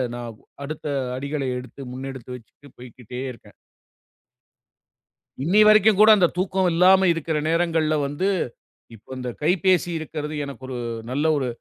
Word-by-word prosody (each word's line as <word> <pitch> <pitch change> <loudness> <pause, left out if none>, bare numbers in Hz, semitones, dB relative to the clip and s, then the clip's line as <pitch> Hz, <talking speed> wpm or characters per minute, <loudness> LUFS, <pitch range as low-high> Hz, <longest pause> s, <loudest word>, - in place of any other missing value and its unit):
நான் 120 -3 -8 0.3
அடுத்த 155 +1 -7 0.3
அடிகளை 140 0 -3
எடுத்து 125 +2 -10
முன்னெடுத்து 130 -1 -7
வச்சுட்டு 125 +4 -16
போய்க்கிட்டே 125 0 -10
இருக்கேன். 115 - -16 1.9
இன்னிய 200 +8 +5
வரைக்கும் 215 -1 +5
கூட 215 - +8
அந்தத் 180 -4 +2
தூக்கம் 185 0 +1
இல்லாம 185 +2 +5
இருக்கிற 160 -1 -2
நேரங்கள்ல 165 -2 +1
வந்து, 145 +8 -1 0.7
இப்போ 110 - -22
அந்தக் 125 -2 -6
கைப்பேசி 180 +1 +2
இருக்கறது 150 -1 -5
எனக்கு 140 -1 -10
ஒரு 125 -2 -5 0.3
நல்ல 145 +4 -1
ஒரு 130 -2 -1
150 Hz, 130 wpm, -23 LUFS, 130-180 Hz, 1.9 s, கூட